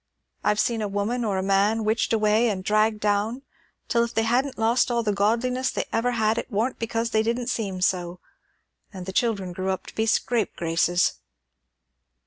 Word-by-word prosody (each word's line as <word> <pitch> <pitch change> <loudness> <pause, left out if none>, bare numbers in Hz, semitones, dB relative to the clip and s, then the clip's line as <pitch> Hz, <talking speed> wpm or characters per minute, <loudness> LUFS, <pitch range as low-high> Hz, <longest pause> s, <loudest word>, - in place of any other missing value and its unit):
I've 210 0 +2
been 230 -2 -3
a 210 - -1
woman 205 +5 -1
or 205 -4 -1
a 190 - -1
man 200 +3 +2
witched 220 +1 0
away 220 +1 +3
and 190 -3 -3
dragged 215 +2 +2
down, 210 +5 0 0.4
till 235 0 +2
if 235 0 -5
they 225 - +2
hadn't 250 +4 0
lost 230 +3 +2
all 235 -1 0
the 210 -2 0
godliness 235 +6 +1
they - - -2
ever 245 +2 +1
had, 220 0 +1
it - - -6
warn't 230 +5 -1
because 230 0 -2
they 220 - +3
didn't 235 +2 -1
seem 195 -6 -3
so. 180 -1 0 0.7
And 185 -3 -8
the 190 - -6
children 200 -5 0
grew 185 +2 -3
up 190 -1 -2
to - - -11
be 220 0 -1
scapegraces.'" 175 -7 +1
220 Hz, 185 wpm, -25 LUFS, 200-235 Hz, 0.7 s, away